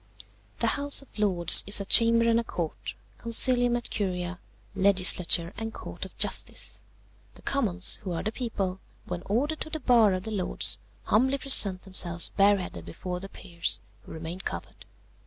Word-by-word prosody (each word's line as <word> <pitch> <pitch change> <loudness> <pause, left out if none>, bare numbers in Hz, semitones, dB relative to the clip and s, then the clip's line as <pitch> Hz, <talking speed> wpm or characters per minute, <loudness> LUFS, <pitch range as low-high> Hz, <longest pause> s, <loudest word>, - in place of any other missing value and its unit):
"The 280 - -1
House 285 -1 +2
of 265 - -17
Lords 180 -5 +5
is 200 - +4
a 200 - -5
chamber 230 +2 +2
and 230 0 +2
a - - -3
court, 115 - -7 0.2
Concilium 245 +1 +3
et 240 - -5
Curia, 180 -3 -4 0.3
legislature 185 -2 +3
and 225 +1 -6
court - - -8
of - - -15
justice. - - 0 0.5
The - - -16
Commons, 195 -10 +2
who 195 -4 -7
are 165 - -5
the 215 - -3
people, 200 -6 -5 0.3
when 180 -1 -6
ordered 285 +10 -2
to - - -6
the 315 - -6
bar 230 -7 +3
of 185 0 -4
the 220 - -7
Lords, 195 -4 +2 0.2
humbly 260 +6 +1
present 205 -9 +5
themselves 175 -3 -1
bareheaded 200 -2 0
before 180 -1 -7
the 195 +1 -11
peers, 170 -4 -2 0.2
who - - -16
remain 165 +3 -8
covered. - - -8
200 Hz, 165 wpm, -26 LUFS, 180-230 Hz, 0.5 s, Lords